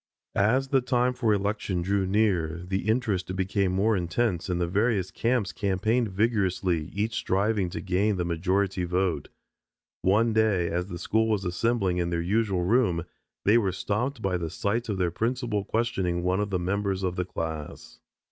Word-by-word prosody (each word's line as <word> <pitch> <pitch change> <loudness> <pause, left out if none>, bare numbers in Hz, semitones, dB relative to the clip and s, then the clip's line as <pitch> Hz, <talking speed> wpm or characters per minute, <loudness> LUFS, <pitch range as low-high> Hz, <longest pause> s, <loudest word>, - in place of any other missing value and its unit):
As 125 +7 +2
the 135 -1 +3
time 125 0 +1
for 120 -3 +1
election 100 -3 -1
drew 95 +1 +1
near, 90 -5 +1
the 95 +3 -2
interest 105 -6 0
became 95 0 0
more 105 +4 +2
intense 90 +1 -1
and 90 -1 0
the 90 - +1
various 100 +1 0
camps 115 -5 0
campaigned 110 +5 +1
vigorously, 95 -5 0
each 105 +3 -2
striving 100 -2 0
to - - -5
gain 100 +2 +1
the 90 - -1
majority 95 +2 0
vote. 90 -4 -1 0.7
One 110 +4 +3
day 105 -6 +2
as 90 +2 -2
the 90 -3 -6
school 110 +6 +1
was 105 -3 0
assembling 95 0 0
in 85 -1 0
their 85 -1 -1
usual 95 +1 +1
room 95 -5 +2 0.4
they 110 +4 +6
were 100 -4 0
stopped 110 +7 -2
by 95 -2 +1
the 85 -2 -3
sight 110 +8 -2
of 100 - -1
their 90 -2 +1
principal 115 0 -1
questioning 95 -7 -1
one 90 +2 +1
of 105 0 -1
the 95 - 0
members 95 +1 -1
of 90 -1 -1
the 90 - -1
class. 80 -4 -6
95 Hz, 175 wpm, -27 LUFS, 90-110 Hz, 0.7 s, they